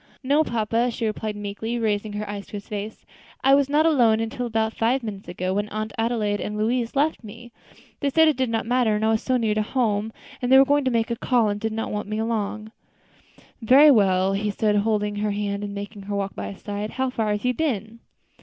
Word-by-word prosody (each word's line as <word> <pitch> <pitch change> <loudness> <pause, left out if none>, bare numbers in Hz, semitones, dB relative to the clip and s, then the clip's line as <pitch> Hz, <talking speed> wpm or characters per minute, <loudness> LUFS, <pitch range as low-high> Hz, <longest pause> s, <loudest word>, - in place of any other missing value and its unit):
"No, 285 +4 +3
papa," 230 -1 0
she 230 -1 -3
replied 215 0 -3
meekly, 205 +3 -4
raising 210 -2 -1
her 210 0 -4
eyes 205 -1 -6
to - - -19
his 200 -1 -7
face, 210 0 -6 0.4
"I 270 - +5
was 280 0 +4
not 300 +2 +3
alone 240 -9 +4
until 225 +2 -3
about 220 -1 -1
five 245 +3 0
minutes 205 -3 -7
ago, 185 +1 -3
when 205 +1 -1
Aunt 215 0 -4
Adelaide 225 -3 -1
and 210 0 -4
Louise 235 +3 -1
left 290 -1 +1
me. 230 +3 -11 0.5
They 285 - 0
said 320 +3 +4
it 310 - +3
did 260 -1 0
not 225 -1 -1
matter, 240 -2 +2
as 210 - -2
I 220 - +3
was 220 0 +1
so 255 -1 +1
near 225 -3 +1
home; 220 -2 -1 0.3
and 245 0 -1
they 265 - +9
were 270 - +7
going 285 0 +2
to - - +3
make 230 -1 0
a - - 0
call, 235 -2 +1
and 205 0 -2
did 220 +1 -2
not 225 +1 -3
want 210 -1 -3
me 215 - -2
along." 220 -1 -3 0.9
"Very 275 +6 +7
well," 195 -4 +3
he 205 +2 -1
said, 210 +1 0
taking 205 0 +2
hold 215 -1 +1
of 205 0 -3
her 210 +1 -1
hand 205 0 -2
and 205 0 -5
making 205 +1 -7
her 200 +1 -5
walk 200 -1 -2
by - - -5
his - - -18
side. 205 +1 -4
"How 260 +2 -2
far 225 -4 -1
have 210 +3 -2
you 250 - +2
been?" 230 -6 -2
220 Hz, 240 wpm, -24 LUFS, 205-245 Hz, 0.9 s, they